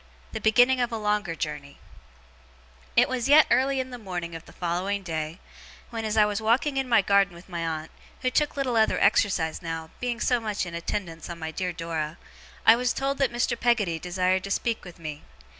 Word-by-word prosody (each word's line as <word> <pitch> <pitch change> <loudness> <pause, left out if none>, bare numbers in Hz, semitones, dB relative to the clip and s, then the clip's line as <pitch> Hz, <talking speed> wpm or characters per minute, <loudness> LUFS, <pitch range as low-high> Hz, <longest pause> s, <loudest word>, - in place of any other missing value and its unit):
THE - - -5
BEGINNING 245 +4 +4
OF 240 0 0
A 225 - -2
LONGER 210 -5 -1
JOURNEY 150 -3 -5 1.2
It - - +6
was 255 0 -2
yet 300 +2 +8
early 265 +1 +3
in 260 0 -3
the 245 - -7
morning 175 -5 -5
of 165 0 -7
the - - -13
following 185 +3 -2
day, 160 0 -4 0.5
when, 225 -1 -4
as 215 0 -1
I 210 - +7
was 210 0 -2
walking 255 +6 +2
in 265 -1 -1
my 230 -4 +5
garden 200 -2 +3
with 170 - -14
my 170 -3 -4
aunt 160 -1 -4 0.3
(who 255 - +1
took 295 +1 +1
little 260 -3 0
other 220 - +3
exercise 185 -6 +2
now, 165 -1 -5
being 245 -1 -2
so 245 0 +2
much 215 -4 -2
in 175 - -7
attendance 170 -1 -4
on 170 - -6
my 160 -1 -5
dear 180 +2 -2
Dora), 165 -2 -4 0.5
I 225 - +9
was 245 +1 0
told 275 +1 -2
that 270 -3 +2
Mr. 240 0 0
Peggotty 225 -9 +1
desired 185 +2 0
to - - -6
speak 230 +3 -1
with 180 -1 -11
me. 155 -3 -7
200 Hz, 210 wpm, -26 LUFS, 170-240 Hz, 1.2 s, I